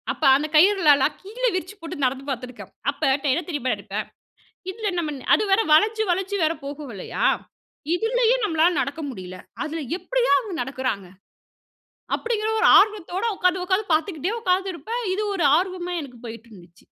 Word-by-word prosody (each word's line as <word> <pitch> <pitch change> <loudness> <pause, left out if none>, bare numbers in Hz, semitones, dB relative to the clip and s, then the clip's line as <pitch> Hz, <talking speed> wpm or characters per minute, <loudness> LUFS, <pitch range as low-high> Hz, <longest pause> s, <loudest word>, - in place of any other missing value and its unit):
அப்ப - - -7
அந்த 295 +3 0
கயிறுகளலாம் 310 -5 +5
கீழே 480 +6 -1
விரிச்சி 370 +3 -4
போட்டு 330 -3 -5
நடந்து 260 +1 -1
பார்த்துருக்கேன். 250 -1 -6 0.2
அப்ப - - -21 0.2
ட - - 0
என்ன 340 +6 -1
தெரியுமா 285 -6 -1
நெனைப்பேன்? - - -5 0.6
இதுல 425 0 -3
நம்ம 305 -3 -3 0.2
அது - - 0
வேற 390 +3 +5
வளைச்சு, 435 +7 +4
வளைச்சு 380 +3 -1
வேற 315 +1 +2
போகும் 285 -1 -7
இல்லயா? 190 - -3 0.7
இதுலயே 470 +4 +2
நம்மளால 330 -3 +3
நடக்க 285 +3 -4
முடியல, 185 -7 -8 0.3
அதுல 320 +1 -4 0.2
எப்டியா - - 0
அவங்க 425 -6 -7
நடக்குறாங்க? 255 -6 -3 1.1
அப்டிங்கிற 440 -2 -1
ஒரு - - +4
ஆர்வத்தோட 405 -1 +1
உட்கார்ந்து 365 0 +1
உட்கார்ந்து 375 0 0
பார்த்துக்கிட்டே 320 +3 0
உட்கார்ந்துருப்பேன். 385 +4 -1
இது 415 - -2
ஒரு 350 -5 0
ஆர்வமா 360 0 -2
எனக்கு 255 -5 -10
போயிட்டு 230 0 -9
இருந்துச்சு. 175 -3 -17
345 Hz, 150 wpm, -23 LUFS, 280-405 Hz, 1.1 s, கயிறுகளலாம்